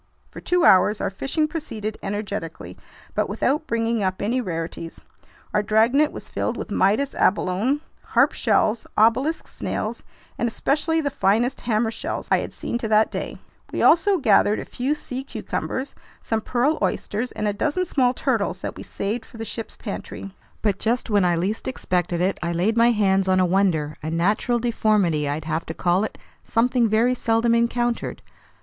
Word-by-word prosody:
For -, -, -9 dB
two 360 Hz, -1 st, +2 dB
hours 195 Hz, +3 st, +5 dB
our -, -, -1 dB
fishing 275 Hz, -, -1 dB
proceeded 220 Hz, -10 st, -5 dB
energetically 200 Hz, -4 st, -5 dB, 0.4 s
but -, -, 0 dB
without 300 Hz, +3 st, 0 dB
bringing 230 Hz, -1 st, 0 dB
up 185 Hz, -1 st, -1 dB
any 240 Hz, +5 st, 0 dB
rarities. 165 Hz, -4 st, -5 dB, 0.5 s
Our 210 Hz, -, +3 dB
dragnet 230 Hz, +8 st, +3 dB
was -, -, -9 dB
filled -, -, -2 dB
with -, -, -6 dB
Midas 220 Hz, +9 st, +2 dB
abalone, 205 Hz, +9 st, +1 dB, 0.2 s
harp -, -, +3 dB
shells, 215 Hz, +1 st, +1 dB
obelisk 255 Hz, +9 st, +3 dB
snails, -, -, -4 dB, 0.4 s
and 240 Hz, -, +1 dB
especially 310 Hz, +7 st, 0 dB
the 285 Hz, -2 st, -1 dB
finest 240 Hz, +2 st, +1 dB
hammer 225 Hz, -1 st, +1 dB
shells -, -, -4 dB
I -, -, +5 dB
had -, -, -5 dB
seen 235 Hz, -, -4 dB
to 230 Hz, -, -3 dB
that 215 Hz, 0 st, +3 dB
day. -, -, -4 dB, 0.3 s
We -, -, -1 dB
also 385 Hz, +4 st, +5 dB
gathered 215 Hz, -, +4 dB
in -, -, -4 dB
a -, -, -13 dB
few 270 Hz, +5 st, -1 dB
sea 260 Hz, -3 st, -6 dB
cucumbers, 270 Hz, 0 st, -4 dB, 0.3 s
some 225 Hz, -1 st, -1 dB
pearl 255 Hz, +8 st, +1 dB
oysters, 225 Hz, +5 st, -1 dB
and 215 Hz, -, -2 dB
a 205 Hz, -, +1 dB
dozen 310 Hz, -, 0 dB
small 255 Hz, -6 st, +2 dB
turtles 220 Hz, -9 st, -1 dB
that -, -, -4 dB
we -, -, -8 dB
saved 220 Hz, +4 st, -3 dB
for 230 Hz, -, -15 dB
the 225 Hz, -, -5 dB
ship's 225 Hz, +1 st, -6 dB
pantry. 195 Hz, -2 st, -7 dB, 0.3 s
But 200 Hz, -3 st, +1 dB
just 235 Hz, +1 st, 0 dB
when 205 Hz, -3 st, +4 dB
I 175 Hz, -1 st, +3 dB
least 190 Hz, +6 st, -2 dB
expected 180 Hz, -8 st, -1 dB
it, 190 Hz, +2 st, 0 dB
I 170 Hz, 0 st, -1 dB
laid 185 Hz, +7 st, +1 dB
my 235 Hz, +1 st, +5 dB
hands 195 Hz, -4 st, +2 dB
on 185 Hz, 0 st, +3 dB
a 185 Hz, -, +4 dB
wonder, 175 Hz, -5 st, +1 dB
a 155 Hz, -, -4 dB
natural 205 Hz, +9 st, +1 dB
deformity 210 Hz, -10 st, +1 dB
I'd 150 Hz, +2 st, -3 dB
have 160 Hz, +1 st, -1 dB
to 160 Hz, -, -5 dB
call 180 Hz, +2 st, +2 dB
it, 215 Hz, -, -4 dB, 0.3 s
something 235 Hz, 0 st, +2 dB
very 230 Hz, +4 st, +3 dB
seldom 230 Hz, -1 st, +1 dB
encountered. 235 Hz, 0 st, 0 dB
220 Hz, 180 wpm, -23 LUFS, 195-245 Hz, 0.5 s, hours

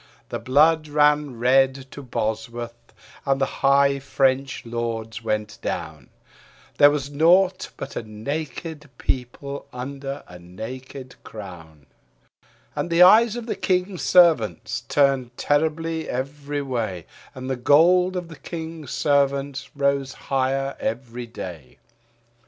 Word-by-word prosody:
The -, -, -3 dB
blood 155 Hz, +4 st, +3 dB
ran 150 Hz, -3 st, +2 dB
red 130 Hz, +2 st, +3 dB
to 145 Hz, -, -8 dB
Bosworth 115 Hz, 0 st, -4 dB, 0.3 s
and 135 Hz, -1 st, +1 dB
the 135 Hz, -, +3 dB, 0.2 s
high 140 Hz, 0 st, +4 dB
French 135 Hz, -1 st, 0 dB
lords 115 Hz, -1 st, -4 dB
went 105 Hz, -1 st, -3 dB
down; 80 Hz, -6 st, -5 dB, 0.7 s
There 145 Hz, -, +9 dB
was 145 Hz, -1 st, -2 dB
naught 180 Hz, +5 st, +3 dB
but 135 Hz, -, -7 dB
a -, -, -2 dB
naked 150 Hz, +7 st, -6 dB
people 140 Hz, +3 st, -4 dB
under 135 Hz, +2 st, -6 dB
a 90 Hz, 0 st, -12 dB
naked 125 Hz, +9 st, -9 dB
crown. 80 Hz, -8 st, -11 dB, 0.9 s
And -, -, -2 dB
the 170 Hz, +1 st, +6 dB
eyes 220 Hz, +4 st, +7 dB
of 240 Hz, -1 st, -5 dB
the 230 Hz, -, -3 dB
King's 185 Hz, -1 st, -1 dB
Servants 155 Hz, -, +3 dB
turned 135 Hz, -4 st, +2 dB
terribly 160 Hz, +2 st, 0 dB
every 140 Hz, +2 st, -3 dB
way, 110 Hz, -, -3 dB, 0.3 s
And 130 Hz, 0 st, -7 dB
the 130 Hz, -, -1 dB
gold 175 Hz, +8 st, +4 dB
of 180 Hz, -2 st, -3 dB
the 165 Hz, -2 st, -12 dB
King's 160 Hz, -2 st, -7 dB
Servants 140 Hz, -1 st, 0 dB
rose 140 Hz, -1 st, 0 dB
higher 135 Hz, +1 st, -1 dB
every 120 Hz, +1 st, -4 dB
day. 85 Hz, -, -9 dB
135 Hz, 125 wpm, -23 LUFS, 120-150 Hz, 0.9 s, There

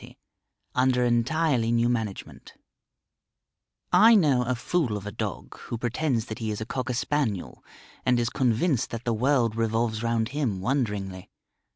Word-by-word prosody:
XXX. -, -, -13 dB, 0.6 s
"UNDER 125 Hz, -1 st, +2 dB
ENTIRELY 120 Hz, 0 st, +1 dB
NEW 120 Hz, 0 st, +2 dB
MANAGEMENT" 110 Hz, -5 st, -4 dB, 1.4 s
I 220 Hz, +6 st, +7 dB
know 145 Hz, -10 st, +4 dB
a 125 Hz, +1 st, -1 dB
fool 125 Hz, -3 st, -1 dB
of 100 Hz, -, -9 dB
a 105 Hz, -, -4 dB
dog -, -, -5 dB
who 115 Hz, -, -5 dB
pretends 120 Hz, 0 st, -1 dB
that 110 Hz, -, -7 dB
he 110 Hz, -2 st, -3 dB
is 105 Hz, -, -3 dB
a 110 Hz, -, -4 dB
Cocker 130 Hz, +1 st, -3 dB
Spaniel, 120 Hz, -8 st, -2 dB, 0.4 s
and 125 Hz, -1 st, +2 dB
is 120 Hz, 0 st, 0 dB
convinced 130 Hz, +1 st, +1 dB
that 115 Hz, 0 st, -6 dB
the 120 Hz, -, 0 dB
world 120 Hz, -1 st, +2 dB
revolves 115 Hz, 0 st, 0 dB
round 115 Hz, -1 st, 0 dB
him 130 Hz, -9 st, -2 dB
wonderingly. 100 Hz, -5 st, -2 dB
120 Hz, 155 wpm, -26 LUFS, 110-130 Hz, 1.4 s, I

